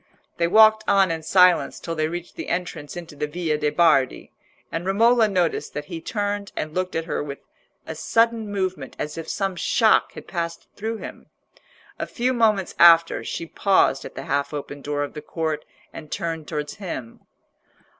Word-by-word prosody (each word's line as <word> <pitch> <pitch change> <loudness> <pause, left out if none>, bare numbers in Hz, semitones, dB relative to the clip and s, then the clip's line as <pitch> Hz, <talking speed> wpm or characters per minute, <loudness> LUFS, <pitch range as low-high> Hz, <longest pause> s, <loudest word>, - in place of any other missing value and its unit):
They 170 - +2
walked 215 +3 +6
on 195 -3 +4
in 165 -1 -3
silence 180 +2 +4
till 165 - -5
they 155 -1 0
reached 175 +1 -6
the - - -6
entrance 175 -3 -4
into 165 -3 -8
the 150 +1 -2
Via 160 0 -1
de' 150 0 +1
Bardi, 155 -5 +2 0.4
and 165 - -3
Romola 225 +4 +4
noticed 180 -5 -1
that 150 - -4
he 165 - -5
turned 205 +1 -3
and 155 0 -4
looked 185 +1 -2
at 165 0 -1
her - - -2
with 140 -1 -6 0.5
a - - -5
sudden 225 +6 +1
movement 185 -8 -3
as 150 - -4
if 165 - -6
some 195 -2 -1
shock 220 +5 +3
had - - -10
passed 170 -2 -4
through 225 +2 -3
him. - - -10 0.7
A - - -3
few 250 +1 -1
moments 215 -6 +2
after, 170 -1 +6
she 165 - -4
paused 165 -6 +2
at - - -9
the - - -6
half 140 +2 -1
open 145 0 -6
door 145 0 -2
of 145 - -6
the 150 - -7
court 155 -1 -3 0.3
and 155 -2 -10
turned 165 -2 -3
towards 150 0 -4
him. 150 - -6
170 Hz, 185 wpm, -23 LUFS, 155-195 Hz, 0.7 s, walked